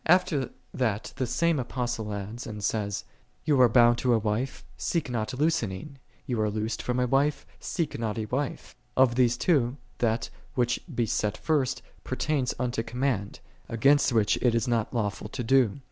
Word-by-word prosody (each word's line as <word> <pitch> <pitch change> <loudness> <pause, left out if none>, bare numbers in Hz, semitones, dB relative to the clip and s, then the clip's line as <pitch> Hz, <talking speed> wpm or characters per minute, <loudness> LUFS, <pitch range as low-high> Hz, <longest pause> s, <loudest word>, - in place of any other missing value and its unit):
After 170 -5 +3 0.2
that 110 -5 -1
the 130 - 0
same 170 +3 +2
Apostle 120 -3 -3
adds, 105 +5 -5
and 105 -2 -6
says, 105 -1 -1 0.4
"Thou 145 -4 +3
art 120 -3 +6
bound 120 -1 +6
to 125 -2 +3
a - - +4
wife, 110 +4 -2
seek 165 -7 -1
not 110 -3 -1
loosening: 140 - -1 0.3
thou 120 -4 -1
art 105 -1 +1
loosed 110 +1 -2
from 125 0 -1
a 125 - +3
wife, 140 +4 +1
seek 165 -8 -2
not 110 -2 -2
a 110 - -2
wife."5 130 +6 -3 0.3
Of 130 -2 +6
these 120 -1 +3
two, 135 -5 +2 0.2
that, 115 0 0 0.2
which 120 -1 +1 0.2
he 120 - +3
set 105 0 -1
first, 150 -5 0 0.2
pertains 145 -5 -1
unto 120 -2 -1
command, 120 -3 -2 0.3
against 140 +5 +4
which 110 -3 +3
it 120 -2 +3
is 115 0 +1
not 115 -3 0
lawful 105 -3 -2
to 125 - -4
do. 125 -2 +3
120 Hz, 175 wpm, -27 LUFS, 110-135 Hz, 0.4 s, art